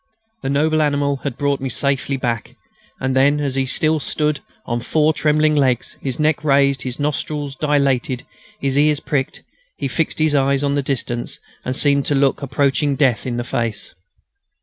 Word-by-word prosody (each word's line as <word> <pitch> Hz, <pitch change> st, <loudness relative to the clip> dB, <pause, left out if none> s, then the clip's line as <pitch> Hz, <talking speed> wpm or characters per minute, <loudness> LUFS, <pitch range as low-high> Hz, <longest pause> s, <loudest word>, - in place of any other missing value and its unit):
The -, -, -3 dB
noble 155 Hz, +3 st, +2 dB
animal 145 Hz, -1 st, +1 dB
had 135 Hz, -2 st, -5 dB
brought 140 Hz, -1 st, 0 dB
me 135 Hz, -, -2 dB
back 125 Hz, -, -3 dB
safely, 140 Hz, -1 st, 0 dB, 0.8 s
and 130 Hz, 0 st, -1 dB
then, 140 Hz, +2 st, +4 dB
as 140 Hz, -3 st, -1 dB
he 135 Hz, 0 st, 0 dB
stood 155 Hz, +3 st, +2 dB
still 150 Hz, +2 st, 0 dB, 0.3 s
on 120 Hz, 0 st, -1 dB
his 120 Hz, -, -11 dB
four 155 Hz, 0 st, +3 dB
trembling 155 Hz, 0 st, +2 dB
legs, 130 Hz, -4 st, +1 dB
his 130 Hz, -1 st, -3 dB
neck 155 Hz, 0 st, +1 dB
raised, 140 Hz, -2 st, +3 dB
his 125 Hz, 0 st, -4 dB
nostrils 145 Hz, -1 st, -2 dB
dilated, 140 Hz, -5 st, 0 dB, 0.3 s
his 135 Hz, 0 st, +1 dB
ears 150 Hz, 0 st, +3 dB
pricked, 135 Hz, -3 st, -2 dB, 0.3 s
he -, -, -2 dB
fixed 160 Hz, +5 st, -1 dB
his 155 Hz, -1 st, +2 dB
eyes 140 Hz, 0 st, +2 dB
on 140 Hz, 0 st, +1 dB
the 145 Hz, -, +1 dB
distance 120 Hz, -3 st, -3 dB, 0.3 s
and 130 Hz, -, -3 dB
seemed 140 Hz, -1 st, +2 dB
to 145 Hz, -, +2 dB
look 135 Hz, 0 st, +2 dB
approaching 140 Hz, +1 st, +1 dB
death 130 Hz, -4 st, +1 dB
in 120 Hz, -1 st, -2 dB
the 120 Hz, -, -1 dB
face. 115 Hz, -2 st, -3 dB
140 Hz, 180 wpm, -20 LUFS, 135-150 Hz, 0.8 s, then